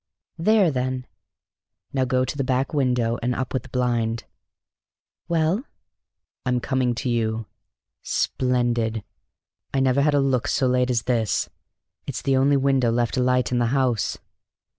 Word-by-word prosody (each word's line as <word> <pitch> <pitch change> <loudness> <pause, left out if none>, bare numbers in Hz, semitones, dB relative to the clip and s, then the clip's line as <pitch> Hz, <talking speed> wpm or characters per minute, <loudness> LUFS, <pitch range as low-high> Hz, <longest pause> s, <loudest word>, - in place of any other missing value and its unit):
"There, 200 -1 +4
then." 130 -1 -2 0.9
"Now 130 -2 +1
go 130 0 +1
to 130 - -4
the 140 - -1
back 130 +2 0
window 125 -5 +1
and 125 +1 0
up 130 0 -3
with 130 - 0
the - - -15
blind." 120 -2 0 1.0
"Well?" 170 +7 +1 0.8
"I'm 125 -1 +1
coming 130 -1 0
to 115 - -3
you. 115 -2 0 0.6
Splendid! 120 -4 0 0.7
I - - +3
never 135 +1 +3
had 150 0 +3
a - - +4
look 135 -1 +1
so 135 - +1
late 125 0 +2
as 120 -2 +1
this. 115 -4 0 0.6
It's - - -4
the 135 - +2
only 140 +2 +4
window 135 -3 +2
left 120 +1 0
alight 125 -1 +2
in 125 - +1
the 120 - +2
house!" 125 -5 0
125 Hz, 150 wpm, -24 LUFS, 120-135 Hz, 1.0 s, There